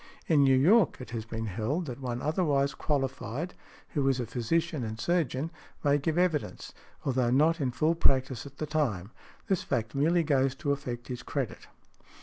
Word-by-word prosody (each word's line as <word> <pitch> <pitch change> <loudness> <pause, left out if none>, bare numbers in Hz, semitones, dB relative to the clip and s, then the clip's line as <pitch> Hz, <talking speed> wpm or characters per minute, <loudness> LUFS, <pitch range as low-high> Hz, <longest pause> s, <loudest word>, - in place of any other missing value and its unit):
In 150 -4 +4
New 135 -1 +5
York, 185 - +5
it 125 - -9
has 115 -2 -4
been 115 0 -4
held 115 - -2
that 130 -2 -6
one 125 -1 -3
otherwise 145 -3 +1
qualified, 135 +2 -2 0.4
who 140 -3 0
is 135 - +2
|112| - - -5
a 120 - -1
physician 135 +6 -1
and 110 0 -5
surgeon, 160 -1 0 0.3
may 145 -1 +3
give 160 +3 -1
evidence, 175 -5 0 0.3
although 130 -3 +2
not 155 +6 +3
in 135 - +1
full 155 +6 +2
practice 130 -5 +1
at 140 0 -14
the 155 - -2
time; 120 - -1 0.4
this 190 -5 +1
fact 115 -5 -2
merely 165 +5 +3
goes 135 -3 +2
to 145 +1 -1
affect 125 -4 -4
his 125 -2 -5
credit. - - -4
140 Hz, 180 wpm, -29 LUFS, 125-155 Hz, 0.4 s, New